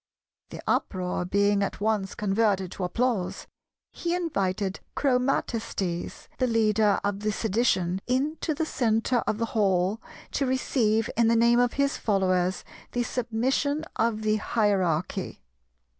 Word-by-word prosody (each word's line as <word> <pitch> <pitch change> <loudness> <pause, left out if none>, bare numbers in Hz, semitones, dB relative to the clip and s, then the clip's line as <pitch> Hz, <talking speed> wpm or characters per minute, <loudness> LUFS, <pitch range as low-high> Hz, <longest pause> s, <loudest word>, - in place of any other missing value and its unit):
The - - -9
uproar 180 -2 -1
being 200 +2 +2
at 200 - -2
once 205 -2 0
converted 195 -2 +1
to 190 - -5
applause, 210 0 -1 0.5
he 345 0 -2
invited 200 - -1 0.2
Chromatistes, 230 -9 -1
the 255 - +2
leader 215 -2 +3
of 200 -1 -1
the 215 +1 -1
Sedition, 195 -4 0
into 295 +5 0
the 320 - -1
centre 235 -2 +1
of 215 - 0
the 230 - 0
hall, 195 0 +1 0.3
to 275 - 0
receive 225 -4 +1
in 230 0 +3
the 230 - +4
name 235 +1 +4
of 245 -1 +2
his 280 0 +1
followers 185 -3 +1 0.3
the 245 - +1
submission 260 +6 -1
of 220 -1 0
the 215 0 +2
Hierarchy. 190 - 0
215 Hz, 130 wpm, -26 LUFS, 195-245 Hz, 0.5 s, the